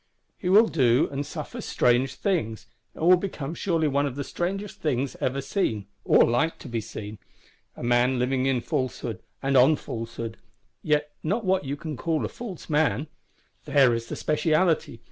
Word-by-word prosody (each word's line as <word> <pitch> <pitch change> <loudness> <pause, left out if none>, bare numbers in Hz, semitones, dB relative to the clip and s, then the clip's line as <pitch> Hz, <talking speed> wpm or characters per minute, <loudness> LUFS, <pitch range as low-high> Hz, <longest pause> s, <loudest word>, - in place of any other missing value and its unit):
He 180 - -3
will 215 +4 +7
do 130 - +3
and 140 +1 -2
suffer - - -6
strange 125 +2 +2
things; 155 - -1 0.3
and 160 - -2
will 180 +1 +7
become 165 -6 -4
surely 165 -3 0
one 140 0 +1
of 130 - -5
the 140 - -3
strangest 195 +7 -4
things 135 -3 -1
ever 135 +2 0
seen, 120 - -1 0.2
or - - +6
like 125 +8 +1
to - - -11
be 115 -2 -2
seen. 105 0 -8 0.6
A - - -7
man 120 +2 +3
living 130 +1 +1
in 130 -3 +1
falsehood, 120 -4 -3 0.2
and 135 0 +1
on 135 +5 +6
falsehood; 115 -3 -6 0.4
yet 150 -1 +1
not 205 +7 -1
what 185 -4 +1
you 135 +1 -2
can 155 -2 -6
call 165 -2 -1
a - - -4
false 215 -8 -8
man: 150 -1 +1 0.6
there 135 -4 +4
is 115 0 -3
the - - -5
specialty! 155 -4 +1
140 Hz, 175 wpm, -26 LUFS, 125-165 Hz, 0.6 s, will